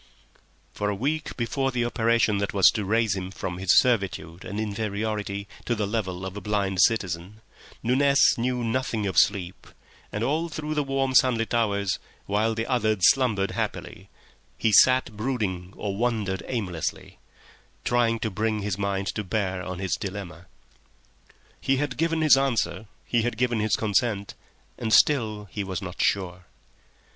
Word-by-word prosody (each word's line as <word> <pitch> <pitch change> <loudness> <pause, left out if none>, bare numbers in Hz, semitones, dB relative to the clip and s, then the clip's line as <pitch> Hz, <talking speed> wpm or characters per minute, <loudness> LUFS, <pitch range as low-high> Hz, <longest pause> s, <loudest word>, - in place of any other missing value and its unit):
For 105 - -2
a 100 - -1
week 150 +8 -2
before 135 +3 -1
the 125 -2 -1
operation 115 -3 +2
that 100 0 -3
was 95 - +7
to 105 - -3
raise 110 0 +1
him 95 -1 -4
from 95 -2 -5
his 95 -1 +4
servitude 100 -8 +1
and 100 +2 -5
inferiority 105 -1 -3 0.2
to 120 - 0
the 105 -2 -1
level 95 -4 -3
of 95 0 -6
a 105 - -6
blind 100 -3 0
citizen 95 -1 0 0.4
Nunez 140 +3 +4
knew 125 +1 -1
nothing 115 -2 -1
of 95 - +3
sleep, 95 -3 0 0.4
and 105 - -3
all 160 +6 0
through 155 -1 -4
the 150 - +1
warm, 135 -1 -1
sunlit 120 -3 +3
hours, 100 -4 +1 0.3
while 110 +3 0
the 115 0 -2
others 110 -7 +4
slumbered 110 -7 0
happily, - - -5 0.5
he 110 - +1
sat 130 +2 +5
brooding 105 -6 -2
or 100 -2 -3
wandered 110 -4 -1
aimlessly, 95 -10 -4 0.7
trying 120 -1 +2
to 110 - -1
bring 110 +1 -1
his 100 -1 -2
mind 100 -1 -1
to 105 - -3
bear 95 -2 -2
on 90 0 -5
his 95 -2 -2
dilemma. 95 -3 -7 1.1
He 135 - +1
had 140 -2 -2
given 165 +3 0
his 155 -3 +7
answer, 110 -8 0 0.2
he 120 - +1
had 120 0 -2
given 120 -1 +1
his 105 -1 +2
consent, 105 -1 0 0.5
and 110 -2 -2
still 110 -7 +3
he 105 - -3
was 95 -2 -4
not 95 -2 -6
sure. 90 -2 0
110 Hz, 160 wpm, -25 LUFS, 95-120 Hz, 1.1 s, was